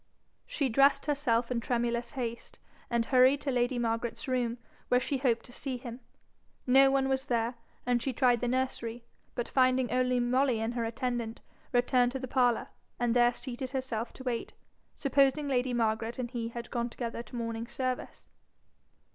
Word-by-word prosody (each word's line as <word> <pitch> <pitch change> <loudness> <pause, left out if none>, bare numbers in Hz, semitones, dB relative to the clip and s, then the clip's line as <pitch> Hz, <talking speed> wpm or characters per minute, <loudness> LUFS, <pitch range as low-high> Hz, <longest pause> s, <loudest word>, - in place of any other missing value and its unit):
She 280 - 0
dressed 275 +4 +4
herself 250 -5 +1
in 245 - +1
tremulous 235 0 -1
haste, 235 -4 -5 0.3
and 235 -1 +1
hurried 260 +2 +5
to 275 - -1
lady 245 0 +1
Margaret's 230 +1 -2
room, 245 -2 0 0.3
where 250 - +4
she 270 +1 -2
hoped 245 -3 +1
to 245 - -12
see 260 +1 -3
him. 240 -1 -8 0.7
No 270 +2 +6
one 270 0 +2
was 265 0 -1
there, 235 0 0 0.3
and 245 -1 +2
she 265 - -1
tried 245 -1 +3
the 245 - 0
nursery, 240 -2 -2 0.3
but 240 - -2
finding 255 -1 +2
only 250 0 +2
Molly 250 0 +2
and 225 +2 -2
her 235 -1 -1
attendant, 235 -1 -3 0.3
returned 245 0 +3
to 265 - -3
the 260 - -5
parlour, 245 -2 +2 0.3
and 240 -1 +1
there 240 0 +5
seated 255 +1 -5
herself 255 -4 -3
to 260 - -10
wait, 240 -3 -3 0.4
supposing 275 +1 +2
lady 255 -2 +1
Margaret 225 0 0
and 245 -2 -4
he 235 -3 -3
had 235 0 -7
gone 240 -1 -1
together 235 -1 -4
to 235 +1 -11
morning 230 -1 -3
service. 255 0 -4
245 Hz, 170 wpm, -30 LUFS, 235-260 Hz, 0.7 s, No